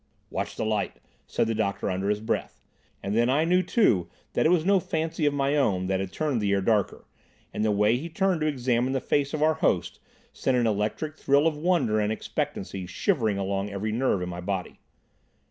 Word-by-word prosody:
"Watch - - -3
the - - -2
light," 110 -2 -1 0.3
said - - 0
the 115 - -1
doctor 105 -3 -1
under 95 +2 -1
his 105 0 0
breath, 110 - -3 0.4
and 100 +2 -2
then 120 +2 +3
I 150 +5 +3
knew 180 +2 +3
too 120 - +2 0.2
that - - +3
it - - +3
was 170 -2 +3
no 195 0 +4
fancy 160 -3 -1
of 145 - +2
my 140 +1 +1
own 100 -11 +1
that 95 0 0
had 95 -1 -4
turned 145 -7 -1
the 100 -1 +1
air 100 - +3
darker, 105 0 0 0.5
and - - -1
the 110 - +2
way 105 +2 +3
he 160 +6 -6
turned 185 0 0
to 155 - +1
examine 130 -2 0
the 135 - +1
face 140 +1 0
of 155 -1 -1
our 160 +1 +4
host - - 0 0.3
sent 130 -1 0
an 120 - +2
electric 110 +9 -1
thrill 140 +2 +3
of 165 -2 +2
wonder 155 -9 +1
and 105 0 +1
expectancy 95 -3 -4
shivering 110 - 0
along 100 +1 -2
every 100 +2 -3
nerve 110 -5 +1
in 90 - -4
my 90 0 -6
body. 95 0 -4
115 Hz, 215 wpm, -26 LUFS, 100-155 Hz, 0.5 s, no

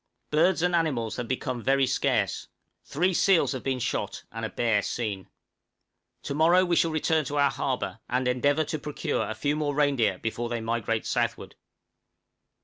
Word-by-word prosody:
Birds 170 +3 +3
and 180 0 +2
animals 125 -10 0
have 120 -2 -4
become 130 -1 -3
very 135 +2 +3
scarce; 130 - 0 0.4
three 180 +6 0
seals 185 0 +3
have 130 -3 -4
been 135 -1 -1
shot, 110 -5 -3
and 115 0 -6
a 110 - -2
bear 115 -3 +1
seen. 100 -4 -4 0.9
To - - -3
morrow 170 +5 +4
we 175 -1 +1
shall 165 - +3
return 155 0 +1
to 145 +2 -3
our 140 -1 +4
harbor, 130 -4 -3
and 125 +1 0
endeavor 140 +5 +2
to 155 0 -4
procure 140 -7 -2
a 110 - -4
few 145 +6 0
more 150 -2 -1
reindeer 140 -9 +2
before 115 +3 -3
they 120 -1 -2
migrate 115 0 -2
southward. - - -2
135 Hz, 170 wpm, -27 LUFS, 115-155 Hz, 0.9 s, morrow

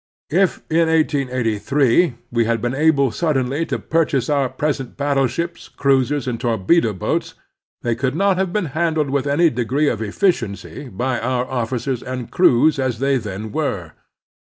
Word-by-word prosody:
If 185 +2 +1
in 165 +1 +2
1883 135 - +1 0.2
we 115 -1 +2
had 115 0 0
been 120 +3 -2
able 140 -2 +3
suddenly 140 +3 0
to - - -1
purchase 150 -5 0
our 140 -3 +1
present 135 -1 -3
battleships, 140 +4 -1
cruisers, 135 0 +1
and 120 -2 -3
torpedo 115 - +2
boats, 95 - -2 0.5
they 120 - +1
could 130 +3 -2
not 195 +2 +2
have 190 -2 0
been 210 -1 0
handled 160 -3 0
with 140 0 0
any 160 +3 +3
degree 130 +5 0
of - - -3
efficiency 115 - -2
by 125 +5 -2
our 125 +1 -1
officers 125 0 -2
and 125 -2 -6
crews 155 -3 +4
as 130 -3 -1
they 135 +2 +1
then 105 -1 -6
were. 100 - -2
135 Hz, 155 wpm, -20 LUFS, 120-155 Hz, 0.5 s, crews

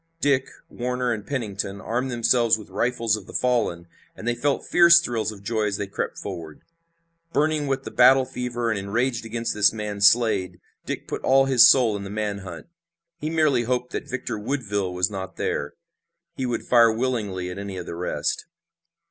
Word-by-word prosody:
Dick, 140 -3 +2 0.2
Warner 125 0 -2
and 105 -2 -7
Pennington 100 -7 -4
armed 120 +6 -2
themselves 120 -1 +3
with 105 - -13
rifles 115 -3 0
of 105 -3 -9
the - - -10
fallen, 115 -9 0 0.3
and 115 - -8
they 120 - +2
felt 140 +4 -1
fierce 170 -1 +7
thrills 115 -9 -2
of 100 -2 -12
joy 110 0 -1
as 100 -2 -1
they 100 - -3
crept 100 - -4
forward. 80 -2 -7 0.7
Burning 150 0 +1
with 135 0 -1
the - - -7
battle 130 +1 +6
fever, 120 -2 -3
and 105 - -1
enraged 115 +4 -1
against 115 +1 -2
this 105 -1 +4
man 105 -2 -5
Slade, 100 -3 +3 0.3
Dick - - -5
put - - -4
all 135 +1 +4
his 130 -3 +7
soul 120 -6 +4
in 100 - -5
the 100 - -7
man 105 -1 -3
hunt. 90 -4 -9 0.5
He 155 - -3
merely 155 -6 +2
hoped 125 +1 -2
that - - -5
Victor 125 -3 -4
Woodville 105 -6 -2
was 90 +2 0
not 95 -1 -6
there. 70 - -2 0.6
He 130 - -2
would 120 -2 -2
fire 115 -2 +5
willingly 110 -7 -2
at 90 - -7
any 100 -1 -6
of 90 - -6
the - - -6
rest. 90 +1 -2
115 Hz, 190 wpm, -24 LUFS, 100-125 Hz, 0.7 s, fierce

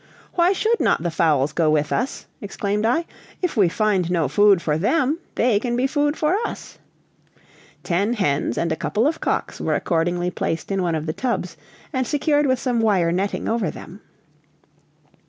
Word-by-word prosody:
"Why 345 +1 +3
should 445 +4 +1
not - - +1
the 170 - -1
fowls 155 -4 +2
go 165 -2 +2
with 150 -1 +1
us!" 255 - -2 0.2
exclaimed 205 +1 -2
I. 325 +8 +1 0.4
"If 360 - 0
we 200 -6 +4
find 195 -3 0
no 170 -5 +1
food 200 +6 +4
for 155 -3 -1
them, 285 - +1 0.2
they 230 -4 +2
can 240 +1 -2
be 250 +2 +1
food 290 +2 0
for 310 +4 +1
us!" - - -7 1.0
Ten 200 +6 0
hens 145 - 0
and 170 -1 0
a - - +1
couple 185 - -1
of 320 +2 0
cocks - - -2
were - - 0
accordingly 175 +1 0
placed 165 +2 -3
in 195 -1 0
one 170 -2 0
of 155 -1 -3
the 155 - -2
tubs, 245 +5 -2 0.4
and 260 -2 -1
secured 295 0 +1
with 260 0 +2
some 245 -2 -1
wire 190 -6 +2
netting 195 +3 -2
over 230 +1 0
them. - - -10
205 Hz, 180 wpm, -22 LUFS, 170-260 Hz, 1.0 s, we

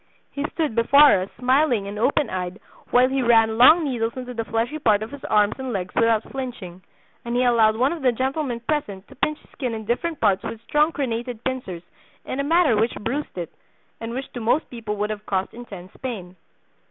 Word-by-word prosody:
He 280 - -4
stood 310 -7 0
before 255 -1 +6
us 190 - -5
smiling 255 -3 +2
and 205 +1 -6
open 275 +4 +2
eyed 185 +1 -4 0.3
while 250 +1 +5
he 265 +1 -1
ran 225 -2 +3
long 315 +7 +8
needles 235 -5 -1
into 250 -1 -6
the 230 -1 -3
fleshy 230 +7 -2
part 215 -6 +2
of 220 - -8
his 285 -1 -10
arms 210 -1 +3
and 260 -1 -4
legs 185 -4 -4
without 230 -2 +2
flinching, 235 -9 -6 0.4
and 235 0 -3
he 250 - +2
allowed 225 -3 +4
one 255 +7 +1
of 335 - -7
the 255 -2 +3
gentlemen 260 0 -2
present 225 -9 -3
to - - -14
pinch 305 0 -1
his - - -25
skin 250 -5 -4
in 220 -1 -7
different 300 +8 -2
parts 195 -1 +2
with 230 - -6
strong 300 +5 +2
crenated 240 -4 -4
pincers 250 -10 -4 0.4
in 265 - -4
a - - +1
manner 325 -4 +3
which 225 +3 +1
bruised 245 +2 -4
it, 170 -2 -5 0.5
and 230 +1 -5
which 265 +1 -6
to 245 - -5
most 235 +7 +1
people 225 -4 -5
would 210 +1 -2
have 210 0 -7
caused 190 -1 -1
intense 200 -6 -10
pain. 200 -8 -6
235 Hz, 210 wpm, -23 LUFS, 215-265 Hz, 0.5 s, long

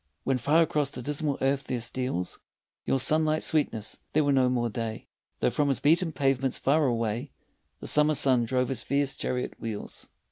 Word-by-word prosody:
When 135 -1 0
far 150 +7 +4
across 150 -3 0
the 125 - -7
dismal 145 +1 -1
earth 135 +1 +1
there 125 - -2
steals 120 -5 -3 0.5
Your - - +2
sunlit 155 +3 +2
sweetness, 115 -9 -1
there 155 - +3
were 145 - +2
no 130 -2 +3
more 120 -1 0
day, 115 0 -4 0.4
Though - - +2
from 145 +5 +1
his 135 - +1
beaten 165 +3 +3
pavements 135 -3 +1
far 150 +2 +2
away 115 +2 -1 0.5
The - - -6
summer 150 0 +3
sun 130 -4 +3
drove 125 +1 0
his 130 -4 -1
fierce 140 0 0
chariot 125 0 -3
wheels. 110 -3 -5
135 Hz, 180 wpm, -27 LUFS, 120-150 Hz, 0.5 s, far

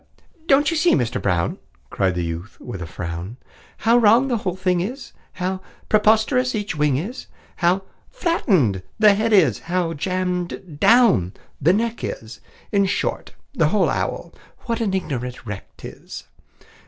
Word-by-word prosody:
"Don't 285 +3 +4
you 330 - 0
see, 340 +2 +4
Mister 120 -4 -1
Brown," 90 -3 0 0.3
Cried 95 -2 0
the 90 - -1
youth, 85 +5 -6
with 110 -7 -7
a 85 - -5
frown, 85 +7 -6 0.4
"How 230 +2 +4
wrong 235 +4 +5
the 240 - +1
whole 185 -4 -3
thing 185 -2 0
is, 250 +9 -6 0.2
How 185 +1 -3 0.3
preposterous 220 +4 +3
each 205 -4 -3
wing 150 -3 +2
is, 215 - -5 0.3
How 180 +3 +2 0.3
flattened 190 - +1 0.2
the 215 -2 +6
head 220 +3 0
is, 160 - +4
how 175 -1 -1
jammed 180 -1 -3
down 225 - +4 0.3
the 155 +5 +5
neck 230 +3 -1
is 115 +2 -6 0.3
In 200 -1 +3
short, - - -2 0.2
the - - +2
whole - - +2
owl, - - -3 0.3
what 230 -1 -3
an 200 -4 0
ignorant 125 -9 -4
wreck 105 -2 -8
't - - -8
is! - - -10
185 Hz, 155 wpm, -22 LUFS, -, 0.4 s, the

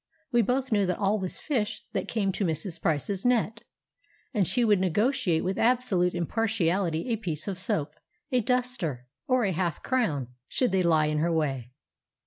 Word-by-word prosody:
We 240 -1 +4
both 255 +4 0
knew 205 -3 +3
that 180 - 0
all 205 +2 +1
was 185 -2 -3
fish 230 -7 -2
that - - -2
came 200 -4 0
to 200 - -2
Mrs. 165 +1 -3
Price's 165 +5 -1
net, 230 -2 +1 0.7
and 200 -7 +2
she 245 -1 +2
would 210 -3 +4
negotiate 185 - +1
with 190 +1 -1
absolute 225 -8 +2
impartiality 180 -1 0
a 230 - +1
piece 165 -7 -4
of 190 -2 -3
soap, 150 -5 -1 0.4
a 250 -1 +3
duster, 235 - -1 0.2
or 255 -2 +3
a 195 - +1
half 170 -2 -2
crown, 160 - 0 0.2
should 250 -5 +1
they 190 -1 +2
lie 160 -3 +3
in 150 0 0
her 170 +2 +1
way. 135 -7 -1
195 Hz, 175 wpm, -27 LUFS, 165-230 Hz, 0.7 s, We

